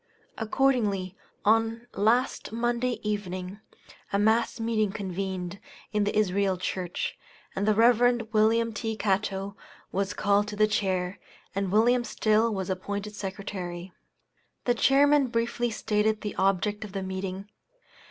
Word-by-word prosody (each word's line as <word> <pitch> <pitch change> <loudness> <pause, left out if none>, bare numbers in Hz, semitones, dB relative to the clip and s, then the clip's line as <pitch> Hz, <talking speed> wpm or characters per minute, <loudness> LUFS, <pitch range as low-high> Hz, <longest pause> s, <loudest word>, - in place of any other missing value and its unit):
Accordingly, 215 -6 +1 0.3
on 225 +2 +2
last 235 +5 +1
Monday 240 +2 0
evening, 190 -2 -3 0.5
a 200 - +2
mass 220 +3 +2
meeting 220 -3 +1
convened 190 -2 -4 0.3
in 210 -1 +2
the 205 - -1
Israel 195 -2 +2
church, 180 -1 -3 0.4
and 195 +2 -1
the 215 - +4
Rev. 240 +2 +5
Wm. 225 +1 +3
T. 220 0 -3
Catto 200 -1 -1 0.4
was 195 +1 -1
called 205 0 +2
to 210 - -5
the 215 +1 +4
chair, 190 -3 -1 0.3
and 195 -1 -1
Wm. 240 +4 +4
Still 220 0 +2
was 190 -2 -2
appointed 200 +3 -4
secretary. 190 -3 -6 0.7
The 245 - +3
chairman 280 +3 +4
briefly 240 0 -1
stated 215 0 0
the 210 - -4
object 195 +2 +1
of 205 -2 -9
the 195 -1 -3
meeting. 190 +1 -4
210 Hz, 130 wpm, -27 LUFS, 195-225 Hz, 0.7 s, Rev